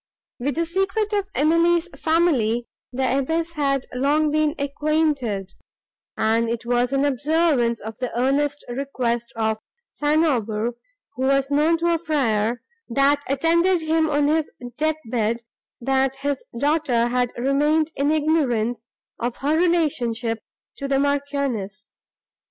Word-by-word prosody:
With 275 +3 -1
the 335 +1 0
secret 390 +5 -1
of 405 -1 0
Emily's 335 +3 +3
family 285 -11 +1 0.3
the 265 +1 +1
abbess 325 +4 -1
had 275 -4 0
long 290 +4 +2
been 305 0 +1
acquainted, 280 -9 -1 0.6
and 225 +1 +2
it 235 0 -3
was 245 +1 +1
in 275 +1 +2
observance 285 -4 +1
of 220 +2 -8
the 250 -1 -3
earnest 285 +3 0
request 240 -2 -2
of 220 -1 0 0.3
St. 305 +2 +2
Aubert, 230 -4 0 0.4
who 260 - -2
was 275 0 +2
known 305 +3 +3
to 335 - -3
the 340 -1 +2
friar, 240 -7 0 0.3
that 275 +4 +3
attended 335 +5 +2
him 315 0 +2
on 290 -1 +2
his 310 +1 +1 0.3
death 310 +2 0
bed, 230 0 -1 0.4
that 265 +1 +1
his 280 0 -3
daughter 280 -4 +1
had 245 0 0
remained 295 +5 +2
in 280 +1 +1
ignorance 255 -8 +1 0.4
of 240 0 -2
her 290 +3 0
relationship 255 -10 +1 0.4
to 275 - -4
the 275 0 +1
Marchioness. 275 -8 -2
275 Hz, 135 wpm, -23 LUFS, 240-310 Hz, 0.6 s, Emily's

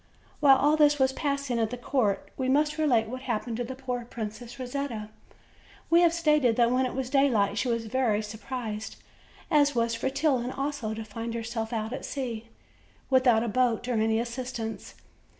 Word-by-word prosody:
While 275 -2 +7
all 295 +3 +3
this 295 -1 +5
was 265 -1 +2
passing 280 -4 -1
at 225 -1 +1
the 250 - -5
court, 240 -6 0
we 260 -1 -1
must 300 +3 +2
relate 250 -8 +3
what 255 +3 -6
happened 235 -2 -3
to 245 - -1
the 260 +2 -6
poor 250 -2 -4
Princess 230 +1 -7
Rosetta. 250 -4 -4 0.8
We 340 +1 +6
have 340 -1 +5
stated 300 -8 +3
that 235 0 +3
when 255 +1 +2
it - - -6
was 260 -1 -3
daylight 235 -8 +3
she - - 0
was 230 -1 -1
very 225 -2 +1
much 215 - -3
sur 215 +1 -8
prised, 220 -4 -5 0.6
as 290 -2 +4
was 230 0 +1
Fretillon 265 0 0
also, 275 -6 -3
to 225 - -5
find 230 +2 -5
herself 225 0 -4
out 220 0 -3
at 270 - -5
sea 235 -5 -5 0.6
without 250 -4 +4
a - - -2
boat 240 +1 +1
or 250 - 0
any 220 0 +2
assistance. 235 -1 -5
245 Hz, 185 wpm, -27 LUFS, 225-270 Hz, 0.8 s, While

